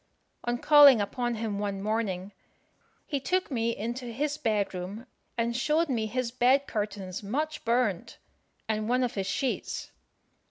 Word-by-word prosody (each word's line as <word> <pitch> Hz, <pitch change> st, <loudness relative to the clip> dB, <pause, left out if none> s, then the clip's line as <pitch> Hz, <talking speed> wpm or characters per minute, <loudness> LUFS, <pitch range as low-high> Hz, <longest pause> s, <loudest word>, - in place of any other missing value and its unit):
On 240 Hz, 0 st, 0 dB
calling 285 Hz, -2 st, +8 dB
upon 240 Hz, +4 st, -1 dB
him 215 Hz, -2 st, -3 dB
one 200 Hz, -1 st, -2 dB
morning, 205 Hz, -2 st, -2 dB, 0.7 s
he 285 Hz, -, -2 dB
took 365 Hz, +5 st, -1 dB
me 230 Hz, -2 st, 0 dB
into 240 Hz, +4 st, -4 dB
his 285 Hz, +5 st, -2 dB
bed 210 Hz, -7 st, 0 dB
room, 190 Hz, +6 st, -6 dB, 0.3 s
and 235 Hz, 0 st, 0 dB
showed 305 Hz, +6 st, +1 dB
me 225 Hz, -4 st, 0 dB
his 240 Hz, +1 st, -2 dB
bed 255 Hz, +3 st, +3 dB
curtains 205 Hz, -4 st, -4 dB
much 300 Hz, +9 st, -3 dB
burnt, 230 Hz, -6 st, 0 dB, 0.5 s
and 215 Hz, 0 st, -1 dB
one 250 Hz, +1 st, +2 dB
of 245 Hz, -, -1 dB
his 195 Hz, -2 st, -2 dB
sheets. 260 Hz, +6 st, -2 dB
235 Hz, 150 wpm, -28 LUFS, 210-260 Hz, 0.7 s, calling